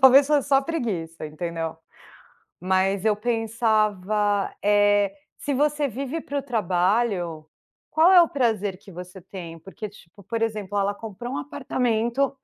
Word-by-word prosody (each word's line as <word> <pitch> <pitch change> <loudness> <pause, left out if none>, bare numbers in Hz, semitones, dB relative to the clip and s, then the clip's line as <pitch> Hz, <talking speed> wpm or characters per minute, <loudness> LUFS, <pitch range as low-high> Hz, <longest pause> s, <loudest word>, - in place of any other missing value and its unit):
talvez 265 +1 +8
fosse 295 -2 +2
só 270 -1 +5
preguiça, 190 - -3
entendeu. 165 +1 -4 0.8
Mas 190 +2 +1
eu 215 -1 +4
pensava, 215 -3 +1
eh, 205 -1 +3 0.2
"se 290 - -2
você 295 +1 +1
vive 275 +5 -4
para 285 - -3
o - - -3
trabalho, 185 - 0 0.4
qual 320 +4 +5
é 365 - +9
o 335 - +1
prazer 215 -8 0
que 195 - -15
você 180 +1 -9
tem?", 170 -2 -9
porque, 195 +5 -8
tipo, 200 -1 -18
por 230 +4 -3
exemplo, 210 -3 -2
ela 200 0 +1
comprou 225 +4 -7
um - - -2
apartamento 260 -2 0
210 Hz, 145 wpm, -24 LUFS, 190-255 Hz, 0.8 s, é